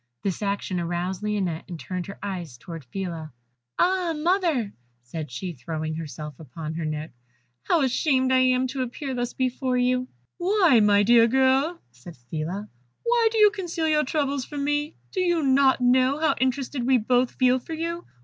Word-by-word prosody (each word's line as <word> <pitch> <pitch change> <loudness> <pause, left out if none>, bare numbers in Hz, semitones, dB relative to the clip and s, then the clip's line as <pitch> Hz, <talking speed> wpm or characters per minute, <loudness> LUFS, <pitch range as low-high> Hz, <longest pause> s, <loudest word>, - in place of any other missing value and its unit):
This 195 0 -2
action 200 -2 -1
aroused 175 +2 -2
Lionette, 195 -6 -2
and 170 -2 -6
turning 180 +1 -4
her 195 - -9
eyes 175 -10 -5
towards 165 0 -9
Phila, 165 -1 -5 0.5
"Ah, 365 -2 +2
mother!" 320 - +1 0.3
said 155 +5 -6
she, 175 +8 -5
throwing 155 +4 -4
herself 150 -2 -7
upon 155 +1 -7
her 165 0 -3
neck, 155 +1 -4 0.5
"how 325 - +2
ashamed 260 0 +2
I 260 - +5
am 255 0 +3
to 265 0 -3
appear 260 +2 -4
thus 245 -1 -2
before 255 0 -1
you." 250 +1 +1 0.3
"Why, 355 - +4
my 205 -1 +5
dear 230 +1 +6
girl," 265 +6 +2
said 125 +7 -13
Phila, 175 +7 -3 0.4
"why 470 -1 +3
do 450 - -2
you 420 -1 +7
conceal 350 -5 -3
your 305 -1 +3
troubles 280 -1 -1
from 285 +2 -5
me? 295 +2 -1 0.2
Do 380 - -3
you 345 -3 +2
not 265 -1 +4
know 255 +2 +4
how 320 0 +3
interested 260 -1 -1
we 260 -1 +5
both 245 +2 +1
feel 255 0 +3
for 320 - -8
you? 335 +2 -4
250 Hz, 175 wpm, -25 LUFS, 175-290 Hz, 0.5 s, you